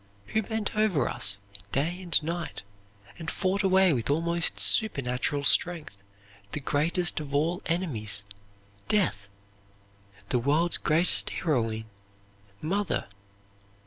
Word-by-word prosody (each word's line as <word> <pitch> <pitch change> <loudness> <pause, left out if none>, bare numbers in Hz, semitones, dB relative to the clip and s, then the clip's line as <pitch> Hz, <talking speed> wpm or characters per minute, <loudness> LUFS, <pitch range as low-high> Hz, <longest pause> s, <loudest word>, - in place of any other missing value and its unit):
Who 220 - +1
bent 220 0 -3
over 195 - +2
us 100 +1 0 0.3
day 165 +7 -1
and 175 -3 +1
night 170 - -4 0.6
and 165 -1 -4
fought 195 +1 0
away 190 -3 +4
with 120 -2 -2
almost 170 +3 +1
supernatural 140 - +2
strength 150 - +1 0.5
the - - -2
greatest 160 +5 0
of 145 -2 -5
all 165 +5 +1
enemies 115 - -1 0.6
death? 105 - +1 1.0
The 125 - +2
world's 150 +7 +2
greatest 165 +4 +2
heroine 115 -9 -1 0.8
Mother! 195 - -1
160 Hz, 110 wpm, -28 LUFS, 135-180 Hz, 1.0 s, away